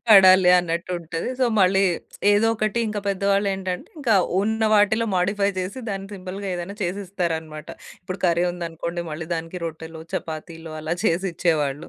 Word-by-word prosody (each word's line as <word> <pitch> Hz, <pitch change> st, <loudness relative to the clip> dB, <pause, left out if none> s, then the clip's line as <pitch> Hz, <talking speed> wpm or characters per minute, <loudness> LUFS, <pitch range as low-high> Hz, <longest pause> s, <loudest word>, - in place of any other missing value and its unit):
పడాలి 185 Hz, -3 st, +8 dB
అన్నట్టు 170 Hz, +1 st, -2 dB
ఉంటది. 165 Hz, +4 st, -4 dB
సో, -, -, +5 dB, 0.2 s
మళ్ళీ 190 Hz, +1 st, +4 dB, 0.5 s
ఏదో 210 Hz, +2 st, +4 dB
ఒకటి 215 Hz, +1 st, -1 dB
ఇంకా 210 Hz, -1 st, -3 dB
పెద్దవాళ్లేంటంటే 195 Hz, -1 st, 0 dB
ఇంకా 235 Hz, -7 st, +2 dB, 0.3 s
ఉన్న 220 Hz, +1 st, -1 dB
వాటిలో 215 Hz, +2 st, +3 dB
మోడిఫై 200 Hz, +2 st, +1 dB
చేసి 190 Hz, +7 st, -5 dB
దాన్ని 195 Hz, 0 st, -5 dB
సింపుల్‌గా 190 Hz, +1 st, -6 dB
ఏదైనా 175 Hz, +4 st, -5 dB
చేసిస్తారనమాట. 175 Hz, -5 st, -3 dB, 0.3 s
ఇప్పుడు 185 Hz, 0 st, -6 dB
కర్రీ 170 Hz, +1 st, +2 dB
ఉందనుకోండి 170 Hz, 0 st, -4 dB
మళ్ళీ 160 Hz, +2 st, -6 dB
దానికి 165 Hz, +2 st, -5 dB
రొట్టెలు, 160 Hz, 0 st, -7 dB
చపాతీలు 160 Hz, 0 st, -6 dB
అలా 160 Hz, +2 st, -2 dB
చేసిచ్చేవాళ్ళు. 165 Hz, -5 st, 0 dB
180 Hz, 135 wpm, -23 LUFS, 165-200 Hz, 0.5 s, పడాలి